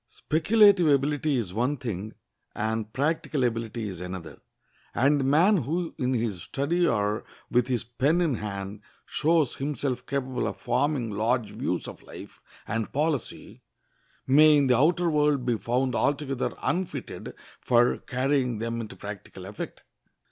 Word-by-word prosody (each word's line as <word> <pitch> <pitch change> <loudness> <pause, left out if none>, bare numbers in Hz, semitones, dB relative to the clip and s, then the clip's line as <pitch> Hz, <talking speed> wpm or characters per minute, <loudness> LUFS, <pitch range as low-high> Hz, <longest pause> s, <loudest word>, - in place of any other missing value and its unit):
Speculative 195 - +4
ability 145 +1 +2
is 105 -8 -2
one 125 +7 0
thing, 110 -4 -5 0.4
and 110 0 -2
practical 145 0 0
ability 115 -2 -2
is 90 -3 -7
another; 90 -2 -7 0.5
and 140 +4 +3
the - - 0
man 165 +10 +4
who 165 +4 -2
in 130 0 +1
his 110 -6 -2
study 170 - 0
or 105 -1 0 0.3
with 125 0 +3
his 125 -4 0
pen 135 +8 +1
in 165 -5 +2
hand 100 -2 -5 0.2
shows 155 -3 +1
himself 135 -3 -2
capable 130 -3 -2
of 100 -3 -4
forming 135 +2 0
large 110 +1 0
views - - -2
of - - -9
life - - -12 0.3
and 115 -1 -2
policy, 150 -2 -2 0.6
may 150 +3 +6
in 140 - +3
the 125 -2 +4
outer 170 +7 +3
world 150 -4 +2
be 120 -2 +2
found 125 +5 0
altogether 140 -1 0
unfitted 180 0 -3 0.2
for 120 -1 +3
carrying 130 -2 0
them 115 +1 -3
into 110 - -8
practical 100 -2 -9
effect. 100 +2 -7
130 Hz, 145 wpm, -27 LUFS, 110-150 Hz, 0.6 s, may